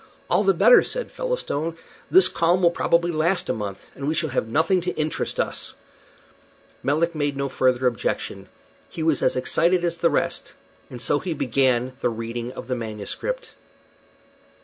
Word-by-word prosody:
"All - - +4
the - - +3
better," - - +7
said - - -4
Featherstone; 170 - -3 0.3
"this 375 +1 +7
calm 175 +2 +1
will 170 - +6
probably 170 0 +1
last 170 +4 0
a - - +2
month, 100 -3 -6
and 140 - -6
we 155 - 0
shall 160 -2 -1
have 120 - -1
nothing 160 - +2
to 180 +1 -3
interest 155 0 -2
us." - - -3 1.1
Melick 160 +5 +1
made 145 -3 -1
no 140 0 -1
further 130 -1 +1
objection. 120 -3 -2 0.4
He 160 - -5
was 160 -3 +2
as - - +2
excited 170 +7 +2
as 170 0 -1
the 170 - +3
rest, - - -1 0.3
and 125 - -8
so 145 - +1
he 170 -1 -3
began 130 -1 +1
the - - +2
reading 115 +1 -5
of - - -8
the 130 - -1
manuscript. 115 - -5
155 Hz, 170 wpm, -23 LUFS, 125-170 Hz, 1.1 s, better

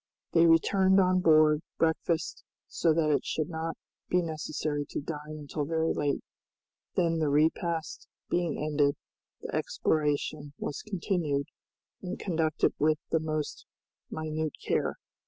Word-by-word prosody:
They 170 0 +5
returned 190 +4 +5
on 185 -1 +4
board, 155 -3 +5 0.2
breakfasted, 165 0 0 0.2
so 165 - +2
that 155 -1 +2
it 145 - +2
should 155 +1 -2
not 160 0 -3 0.3
be 180 0 +3
necessary 155 -2 -2
to - - -3
dine 150 0 -6
until 150 0 -4
very 160 +2 0
late; 145 -1 -1 0.7
then 165 -2 +2
the 155 -2 +1
repast 160 +2 0 0.2
being 175 -3 0
ended, 145 -1 +1 0.5
the - - -6
exploration 150 -1 0
was 145 - -4
continued 170 -8 -1 0.6
and 185 0 -4
conducted 160 -4 +1
with 155 +1 +3
the 165 - +3
most 155 -1 -3 0.4
minute 155 -1 -3
care. - - +1
160 Hz, 130 wpm, -29 LUFS, 150-165 Hz, 0.7 s, They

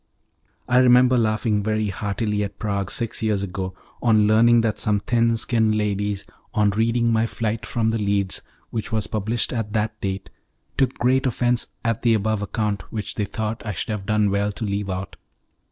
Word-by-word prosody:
I 125 - +4
remember 125 0 +6
laughing 110 -2 +1
very 110 0 0
heartily 105 +2 -1
at 100 - -6
Prague 100 -2 -2
six 115 0 -3
years 105 -3 0
ago, 95 -1 -4 0.3
on 110 -3 +4
learning 115 +2 +5
that 110 -2 -1
some 105 -1 +2
thin 115 +2 +2
skinned 110 -2 +1
ladies, 105 -1 -1 0.3
on 105 -1 +3
reading 115 +2 +2
my 110 +1 +2
flight 115 0 -3
from 110 -2 0
The 115 - -1
Leads, 100 -2 0 0.3
which 110 0 -3
was 110 -2 0
published 110 +4 -1
at 110 -3 -3
that 110 0 -1
date, 95 0 -4 0.4
took 130 -1 +1
great 130 +2 +2
offence 120 -1 +1 0.2
at 115 -2 0
the 115 -2 +4
above 110 0 0
account, 105 0 -2
which 110 -3 -4
they 105 - -1
thought 110 +2 -4
I 105 -3 -3
should - - -4
have 105 -3 -3
done 105 -1 +2
well 100 +1 +1
to 110 - -4
leave 100 0 -2
out. 95 0 -5
110 Hz, 185 wpm, -23 LUFS, 100-115 Hz, 0.4 s, remember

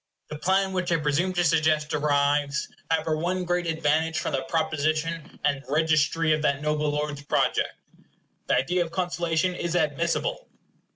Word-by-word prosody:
The 150 - -5
plan 190 +2 +1
which 185 -1 -1
I - - +4
shall 155 - -2
presume 155 +6 +1
to 175 -1 +1
suggest 155 -2 +2
derives, 145 0 +1 0.2
however, 160 -1 +1
one 180 +3 -1
great 175 0 0
advantage 160 0 +1
from - - -2
the 135 - 0
proposition 155 0 -2
and 140 -1 0
registry 155 +1 +2
of 155 - 0
that 140 -2 +1
noble 150 0 0
lord's 150 -1 -2
project. 145 - 0 0.7
The - - +3
idea 175 +6 +1
of 165 - -9
conciliation 175 -1 0
is 170 -1 -3
admissible. 170 - 0
160 Hz, 160 wpm, -26 LUFS, 150-175 Hz, 0.7 s, I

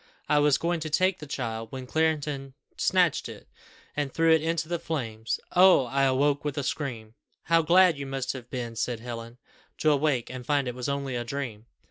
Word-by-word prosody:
I 150 - +4
was 145 -2 +4
going 170 +1 -1
to 155 0 -4
take 185 +4 +2
the 150 - -9
child, 115 -5 -4
when 130 -1 -6
Clarendon 145 -2 -1 0.2
snatched - - +2
it, - - -11 0.5
and 145 -2 -1
threw 165 +2 +3
it 160 - +4
into 165 0 -1
the 170 0 -2
flames. 115 -9 -3 0.2
Oh! 180 -7 +7
I 135 +3 +1
awoke 140 +2 +2
with 145 -1 -3
a 145 - -1
scream!" 120 -6 -4 0.3
"How 165 0 +3
glad 175 -1 +5
you 140 - -5
must 135 -1 -2
have 125 -3 -9
been," 120 -2 -5
said 120 0 -2
Helen, 115 0 -7 0.4
"to 155 - +3
awake 140 -5 +1
and 130 -1 -7
find 140 0 +1
it 125 - -2
was 125 +2 -4
only 140 -2 -2
a 120 - -2
dream!" 120 -4 -5
140 Hz, 200 wpm, -27 LUFS, 125-155 Hz, 0.5 s, Oh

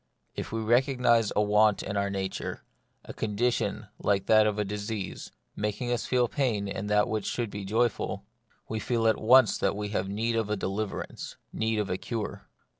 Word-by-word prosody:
If - - -5
we 115 0 -2
recognise 120 -1 +3
a 105 - +4
want 105 0 +3
in 100 - -4
our 100 0 +1
own 100 - -4
nature, 95 -1 -4 0.4
a - - -8
condition 110 +3 -1
like 100 -1 +1
that 110 -1 +5
of 105 -1 -1
disease, 105 -1 -4 0.2
making 105 +4 -2
us 120 -1 -1
feel 125 -1 +3
pain 115 -7 0
in 100 +1 -4
that 105 0 +3
wlrch 110 -4 -2
should 120 -4 -2
be 100 -1 -5
joyful, 115 +4 0 0.4
we 110 - -3
feel 115 -1 +1
at 110 - +2
once 130 +4 +6
that - - +1
we 105 0 -3
have 95 -2 -1
need 115 +3 -1
of 110 -2 0
a 105 - +1
deliverance, 100 +2 -4 0.2
need 110 0 0
of 105 -2 -1
a 90 - -1
cure. 115 -3 -5
110 Hz, 190 wpm, -28 LUFS, 100-115 Hz, 0.4 s, once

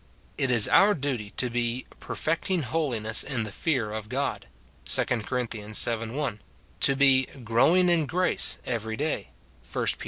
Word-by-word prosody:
It 135 - 0
is 120 -4 +5
our 205 +1 +5
duty 130 -8 -3
to 125 -2 +2
be 120 +1 -2
"perfecting 165 +1 -2
holiness 120 -8 +2
in 130 -5 -3
the 105 - -6
fear 125 -4 -1
of 110 0 -6
God," - - -3 0.4
2 - - +2
Cor. 120 +2 -2
vii. 110 -2 -8 0.4
1; 135 -8 -3 0.4
to 135 - +4
be 135 -1 +4 0.2
"growing 160 +11 +3
in 170 -4 +2
grace" 180 +4 0
every 110 -2 -3
day, 155 +1 -3 0.4
1 - - -2
Pet. - - +1
125 Hz, 155 wpm, -26 LUFS, 110-150 Hz, 0.4 s, is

